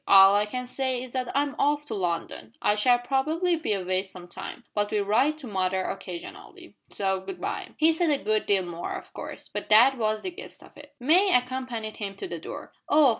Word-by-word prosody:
"All 195 0 +8
I 205 +1 +2
can 250 +3 -4
say 255 0 -2
is 255 - -10
that 255 -2 -2
I'm 285 0 0
off 295 +1 +2
to 280 - -5
London. 170 - -3
I 205 - +3
shall 245 +4 +4
probably 310 +8 +1
be 320 -9 -1
away 185 -1 0
some 185 -2 -6
time, 210 +7 -7
but 205 0 0
will 210 -1 +1
write 255 +9 +2
to 285 -5 -7
mother 190 -2 0
occasionally. 185 -3 -8
So 190 -1 0
good 270 - -8
bye." - - -4
He 320 +1 +5
said 330 0 +1
a 290 - +3
good 215 -5 0
deal 195 -2 +3
more, 175 0 -5
of - - -9
course, - - -8
but - - -6
that 240 +5 +6
was 215 -1 0
the 370 - -3
gist - - -11
of - - -17
it. 290 0 -14
May 350 +10 +4
accompanied 250 -3 -2
him 200 -2 -5
to 385 - -6
the - - -5
door. - - -8 0.2
"Oh! 295 -2 +6
235 Hz, 220 wpm, -27 LUFS, 195-280 Hz, 0.2 s, All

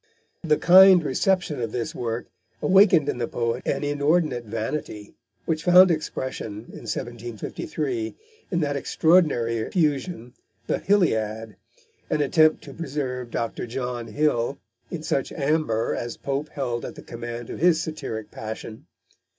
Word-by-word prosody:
The 155 -3 +3
kind 185 0 +8
reception 155 0 0
of 115 -2 -2
this 120 -1 -3
work 115 0 -3 0.3
awakened 185 -6 +5
in 125 - -2
the 120 - -1
poet 115 +1 -2
an - - 0
inordinate 145 -3 +1
vanity, 110 -1 -5 0.3
which 160 -1 -1
found 180 +1 +8
expression, 130 -8 -4
in - - -9
1753, 120 +2 -4 0.3
in 170 - 0
that 145 -2 -1
extraordinary 140 -6 +2
effusion, 140 - -1 0.3
The - - -1
Hilliad, 110 - +1 0.5
an 150 - 0
attempt 155 +2 +3
to 140 - -10
preserve 130 -6 -4
Dr. 115 +1 -3
John 120 -1 -4
Hill 135 0 0 0.3
in 165 -3 -5
such 135 - -1
amber 140 -6 0
as 120 0 -4
Pope 140 +2 -3
held 125 -5 -3
at - - -6
the - - -11
command 120 0 -7
of - - -6
his 170 -1 +4
satiric 115 -10 -5
passion. 110 0 -8
135 Hz, 135 wpm, -24 LUFS, 115-155 Hz, 0.5 s, kind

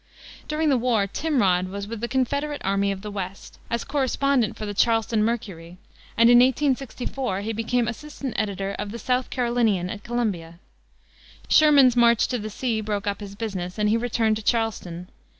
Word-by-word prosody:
During 305 0 0
the 265 -3 +3
war 230 -4 +2
Timrod 195 - +1
was 200 +1 -6
with 225 0 -6
the 235 - -1
Confederate 280 +4 -1
Army 200 +1 +1
of 195 0 -6
the 210 - -6
West, 195 -1 -7
as 235 0 -1
correspondent 275 -3 0
for 215 - -5
the 205 - -4
Charleston 225 0 +2
Mercury, 185 -7 -4 0.4
and 230 +1 +6
in 240 0 +7
1864 260 -4 0
he 220 +2 -3
became 230 +2 0
assistant 270 +1 -6
editor 200 -2 -2
of 205 -1 -4
the 235 - -6
South 250 +2 -1
Carolinian, 235 -7 0
at 205 -1 -8
Columbia. 200 -9 -3 0.9
Sherman's 285 -5 +6
"march 235 -2 +4
to 250 - -1
the 215 0 -5
sea" 225 0 -2
broke 210 0 -3
up 200 -1 -2
his 200 -1 -8
business, 190 -4 -5
and 210 0 +1
he 220 - +3
returned 230 -2 +1
to - - -6
Charleston. 205 -6 -2
225 Hz, 175 wpm, -24 LUFS, 200-250 Hz, 0.9 s, in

